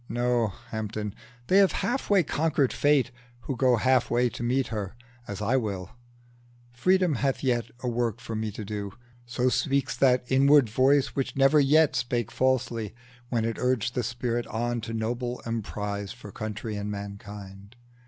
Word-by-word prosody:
No, 120 Hz, 0 st, +1 dB, 0.2 s
Hampden! 105 Hz, -1 st, -4 dB, 0.3 s
they 190 Hz, +8 st, +4 dB
have 195 Hz, -2 st, +5 dB
half 255 Hz, +3 st, -1 dB
way 200 Hz, -3 st, +5 dB
conquered 150 Hz, -3 st, +1 dB
Fate 145 Hz, -3 st, +3 dB, 0.3 s
Who 135 Hz, -, -4 dB
go 125 Hz, 0 st, +4 dB
half 130 Hz, +1 st, +2 dB
way 120 Hz, +1 st, +2 dB
to 120 Hz, -, -8 dB
meet 125 Hz, +2 st, 0 dB
her, 105 Hz, -2 st, -4 dB, 0.3 s
as 100 Hz, 0 st, -5 dB
will 105 Hz, -5 st, -1 dB
I. 120 Hz, 0 st, -29 dB
Freedom 185 Hz, +5 st, +3 dB
hath 135 Hz, +2 st, -1 dB
yet 120 Hz, -3 st, 0 dB
a 125 Hz, -, -3 dB
work 120 Hz, -2 st, -1 dB
for 115 Hz, -2 st, -6 dB
me 110 Hz, 0 st, -2 dB
to 105 Hz, -, -6 dB
do; 100 Hz, -1 st, -5 dB, 0.3 s
So 125 Hz, +1 st, 0 dB
speaks 140 Hz, +1 st, 0 dB
that 125 Hz, -2 st, +4 dB
inward 135 Hz, -1 st, +5 dB
voice 135 Hz, +4 st, +3 dB
which 135 Hz, +1 st, -3 dB
never 135 Hz, +2 st, +5 dB
yet 150 Hz, +2 st, +4 dB
Spake 120 Hz, -2 st, -1 dB
falsely, 120 Hz, -4 st, 0 dB, 0.3 s
when 115 Hz, -3 st, 0 dB
it 115 Hz, -1 st, -2 dB
urged 125 Hz, -2 st, 0 dB
the 125 Hz, -, 0 dB
spirit 120 Hz, 0 st, -2 dB
on 120 Hz, +1 st, -2 dB
To 115 Hz, -, -6 dB
noble 120 Hz, +2 st, -2 dB
deeds 105 Hz, -3 st, -3 dB
for 115 Hz, -4 st, -11 dB
country 110 Hz, +1 st, -5 dB
and 105 Hz, 0 st, -4 dB
mankind. 100 Hz, 0 st, -8 dB
120 Hz, 165 wpm, -27 LUFS, 110-130 Hz, 0.3 s, have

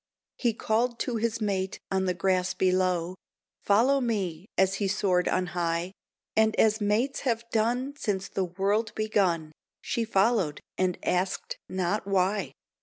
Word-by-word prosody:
He 235 Hz, -3 st, +1 dB
called 235 Hz, +2 st, 0 dB
to 240 Hz, -2 st, -1 dB
his 230 Hz, 0 st, -1 dB
mate 195 Hz, -2 st, -1 dB
on 190 Hz, -1 st, +1 dB
the 180 Hz, -1 st, 0 dB
grass 185 Hz, 0 st, +1 dB
below, 185 Hz, -2 st, +1 dB, 0.5 s
"Follow 250 Hz, +7 st, +3 dB
me," 195 Hz, -7 st, -2 dB
as 190 Hz, 0 st, +4 dB
he 200 Hz, -, +2 dB
soared 190 Hz, -2 st, +1 dB
on 185 Hz, -, +1 dB
high; 170 Hz, 0 st, -1 dB, 0.4 s
And 220 Hz, 0 st, +3 dB
as 220 Hz, 0 st, +3 dB
mates 215 Hz, +7 st, +1 dB
have 235 Hz, -3 st, -1 dB
done 245 Hz, +5 st, 0 dB
since 195 Hz, -8 st, -2 dB
the 190 Hz, -, -1 dB
world 200 Hz, +5 st, -1 dB
begun 185 Hz, -7 st, +1 dB, 0.3 s
She 235 Hz, -, -2 dB
followed, 200 Hz, -7 st, +2 dB, 0.2 s
and 185 Hz, -1 st, 0 dB
asked 185 Hz, +1 st, -1 dB
not 190 Hz, +3 st, -1 dB
why. 195 Hz, +1 st, +1 dB
195 Hz, 145 wpm, -28 LUFS, 185-225 Hz, 0.5 s, as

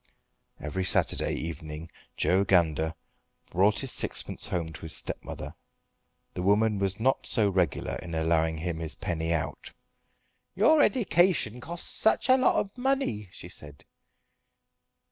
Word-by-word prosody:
Every 85 Hz, +5 st, -3 dB
Saturday 90 Hz, -, +2 dB
evening 80 Hz, 0 st, -6 dB, 0.3 s
Joe 95 Hz, +2 st, +3 dB
Gander 80 Hz, -4 st, +2 dB, 0.6 s
brought 100 Hz, +4 st, +3 dB
his 135 Hz, -2 st, -1 dB
sixpence -, -, -1 dB
home 85 Hz, -3 st, -3 dB
to -, -, -10 dB
his 80 Hz, -1 st, -3 dB
stepmother. -, -, -5 dB, 0.8 s
The -, -, -4 dB
woman 105 Hz, +2 st, +2 dB
was 95 Hz, 0 st, +1 dB
not 130 Hz, +4 st, +1 dB
so 105 Hz, -5 st, +2 dB
regular 90 Hz, -5 st, 0 dB
in 85 Hz, -2 st, -7 dB
allowing 80 Hz, 0 st, +1 dB
him 85 Hz, 0 st, -3 dB
his 80 Hz, -1 st, -2 dB
penny 80 Hz, -1 st, -3 dB
out. 85 Hz, -3 st, -3 dB, 0.8 s
"Your 290 Hz, -, +5 dB
edication 175 Hz, -, +2 dB
costs 170 Hz, +5 st, -5 dB
such 220 Hz, +3 st, +2 dB
a 260 Hz, -, +8 dB
lot 255 Hz, -, +3 dB
of 200 Hz, -, -1 dB
money," 255 Hz, -, -1 dB
she -, -, -9 dB
said. 75 Hz, -1 st, -10 dB
95 Hz, 135 wpm, -28 LUFS, 80-130 Hz, 0.8 s, a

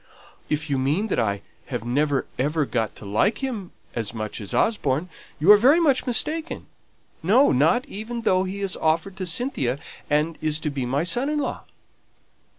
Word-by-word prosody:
"If 150 Hz, +1 st, -1 dB
you 140 Hz, -3 st, 0 dB
mean 155 Hz, +12 st, 0 dB
that -, -, 0 dB
I 100 Hz, -3 st, -1 dB, 0.2 s
have 115 Hz, -, -4 dB, 0.5 s
ever 150 Hz, +3 st, +1 dB
got 115 Hz, -5 st, -2 dB
to -, -, -10 dB
like 105 Hz, -, +1 dB
him 220 Hz, -9 st, -3 dB, 0.2 s
as 115 Hz, -1 st, -3 dB
much 110 Hz, 0 st, -5 dB
as 100 Hz, -, -6 dB
Osborne, 165 Hz, -, +1 dB, 0.3 s
you 165 Hz, +7 st, +7 dB
are 210 Hz, -, +10 dB
very 270 Hz, +10 st, +5 dB
much 280 Hz, -6 st, +2 dB
mistaken; 310 Hz, +7 st, -1 dB, 0.6 s
no, 230 Hz, -, +5 dB
not 165 Hz, -, +3 dB
even 230 Hz, +3 st, -6 dB
though 185 Hz, -3 st, +3 dB
he 190 Hz, +2 st, -5 dB
has 195 Hz, -2 st, -1 dB
offered 165 Hz, +4 st, 0 dB
to 185 Hz, -1 st, -3 dB
Cynthia, 160 Hz, -, -1 dB, 0.3 s
and 150 Hz, +2 st, +1 dB
is 155 Hz, 0 st, +1 dB
to 150 Hz, -, -1 dB
be 135 Hz, -3 st, -3 dB
my 140 Hz, +5 st, 0 dB
son 245 Hz, +10 st, +1 dB
in 300 Hz, -, 0 dB
law." 290 Hz, -, -3 dB
165 Hz, 175 wpm, -24 LUFS, 135-225 Hz, 0.6 s, are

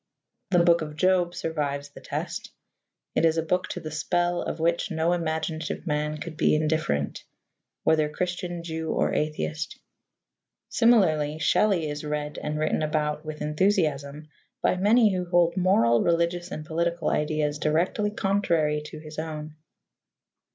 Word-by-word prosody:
The 180 Hz, -, +3 dB
Book 170 Hz, -1 st, +4 dB
of 150 Hz, -1 st, -5 dB
Job 180 Hz, +1 st, +2 dB
survives 145 Hz, -3 st, -2 dB
the -, -, -13 dB
test: -, -, -5 dB, 0.6 s
it -, -, +1 dB
is 165 Hz, 0 st, +3 dB
a 165 Hz, -, +1 dB
book 180 Hz, +3 st, 0 dB
to -, -, -5 dB
the 155 Hz, -, -7 dB
spell 175 Hz, +3 st, 0 dB
of -, -, -4 dB
which 170 Hz, +1 st, +1 dB
no 165 Hz, +1 st, +1 dB
imaginative 160 Hz, -1 st, -2 dB
man 150 Hz, -1 st, -1 dB
could 160 Hz, +1 st, -7 dB
be 155 Hz, -, +3 dB
indifferent, 155 Hz, -, 0 dB, 0.6 s
whether 155 Hz, -1 st, +3 dB
Christian, 175 Hz, +1 st, -3 dB
Jew 160 Hz, -1 st, -4 dB
or -, -, +1 dB
atheist. 155 Hz, 0 st, -2 dB, 0.9 s
Similarly, 160 Hz, -11 st, +3 dB
Shelley 170 Hz, +2 st, +2 dB
is 145 Hz, 0 st, -5 dB
read 150 Hz, 0 st, -3 dB
and 150 Hz, 0 st, -3 dB
written 155 Hz, +1 st, 0 dB
about 150 Hz, -1 st, -1 dB
with 155 Hz, -1 st, -6 dB
enthusiasm 150 Hz, -3 st, 0 dB, 0.3 s
by -, -, +3 dB
many 210 Hz, +3 st, +4 dB
who 180 Hz, -1 st, -1 dB
hold 175 Hz, -1 st, +3 dB
moral, 120 Hz, -, +4 dB
religious, 170 Hz, +1 st, +1 dB
and 155 Hz, -2 st, -6 dB
political 170 Hz, 0 st, -1 dB
ideas 150 Hz, -1 st, 0 dB
directly 170 Hz, +8 st, +1 dB
contrary 170 Hz, -7 st, +1 dB
to 155 Hz, -, -8 dB
his 155 Hz, 0 st, -8 dB
own. 155 Hz, -1 st, -5 dB
160 Hz, 145 wpm, -26 LUFS, 150-175 Hz, 0.9 s, Book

